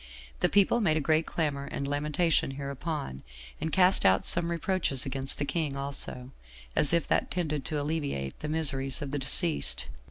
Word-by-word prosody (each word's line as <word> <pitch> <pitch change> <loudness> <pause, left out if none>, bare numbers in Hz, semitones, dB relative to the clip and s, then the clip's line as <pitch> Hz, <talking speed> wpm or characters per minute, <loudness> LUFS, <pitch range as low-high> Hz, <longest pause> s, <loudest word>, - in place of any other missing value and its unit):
The - - +2
people 205 +4 +3
made 160 -7 +2
a - - +1
great 155 +2 +1
clamor 145 -4 -2
and 140 0 -5
lamentation 150 +4 0
hereupon, 140 - -5 0.4
and 160 0 -3
cast 185 +2 +4
out 95 0 +3
some 170 0 +2
reproaches 170 -5 +1
against 135 0 -3
the 145 - -1
king 150 -3 -2
also, 135 -2 -5 0.4
as 145 - +4
if 170 -2 +1
that - - 0
tended 155 -5 -3
to 150 - -3
alleviate 145 - -4
the 150 - -5
miseries 135 -4 +1
of 140 - -6
the 145 - -2
deceased. 135 - +4
145 Hz, 170 wpm, -28 LUFS, 135-165 Hz, 0.4 s, cast